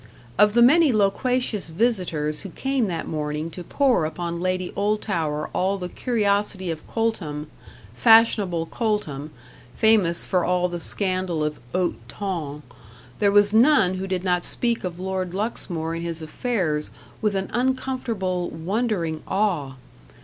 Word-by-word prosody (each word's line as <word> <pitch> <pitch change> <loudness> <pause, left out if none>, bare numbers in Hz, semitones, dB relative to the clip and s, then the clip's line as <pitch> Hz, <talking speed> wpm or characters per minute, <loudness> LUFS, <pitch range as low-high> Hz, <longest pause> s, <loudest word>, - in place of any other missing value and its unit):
Of 210 0 +6
the 235 - +7
many 305 +4 +6
loquacious 215 0 +1
visitors 165 -6 0
who 195 - -7
came 265 +3 -1
that 170 -3 -3
morning 150 +1 -3
to 180 - -7
pour 260 - +2
upon 170 +2 -3
Lady 185 0 -1
Oldtower 185 -7 -1
all 195 +2 +1
the 180 -2 -5
curiosity 200 -5 0
of 155 -1 -7
Coltham 165 -10 -2 0.4
fashionable 215 -7 +4
Coltham, 165 - -2 0.5
famous 210 -6 +3
for 180 -2 +1
all 180 0 +1
the 175 0 -4
scandal 185 -3 0
of 150 0 -2
haut 180 +2 0
ton 160 -7 -4 0.6
there 200 -1 +4
was 205 0 +4
none 225 -5 +5
who 190 +1 -4
did 185 -1 -2
not 180 -2 +1
speak 235 -1 -1
of 180 -1 -5
Lord 185 -1 -3
Luxmore 175 -6 -3
and 165 - -4
his 165 -1 -4
affairs 155 -4 -1 0.3
with 210 -2 +1
an 195 0 -2
uncomfortable, 240 -8 -1
wondering 170 -2 -2
awe. 180 -10 0
185 Hz, 140 wpm, -24 LUFS, 165-215 Hz, 0.6 s, the